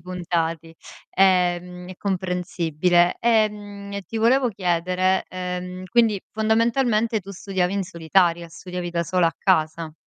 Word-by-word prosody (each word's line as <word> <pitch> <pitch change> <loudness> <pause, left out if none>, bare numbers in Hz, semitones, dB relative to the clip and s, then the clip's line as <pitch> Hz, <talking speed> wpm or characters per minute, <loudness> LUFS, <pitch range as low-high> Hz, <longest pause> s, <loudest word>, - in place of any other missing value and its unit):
puntati, 165 -2 -3 0.4
ehm, 180 -1 +1
è 185 - -9
comprensibile. 180 -2 0
Ehm, 205 -3 0
ti 225 - -6
volevo 245 +4 +3
chiedere, 185 -1 0
ehm, 180 0 -5
quindi 225 -2 +2
fondamentalmente 225 +1 +1
tu 195 +1 -11
studiavi 190 -1 -2
in 200 - 0
solitaria, 170 -1 +1
studiavi 175 +1 -6
da 170 0 -1
sola 175 +1 +1
a 165 - -1
casa. 160 -3 0
185 Hz, 120 wpm, -23 LUFS, 175-200 Hz, 0.4 s, volevo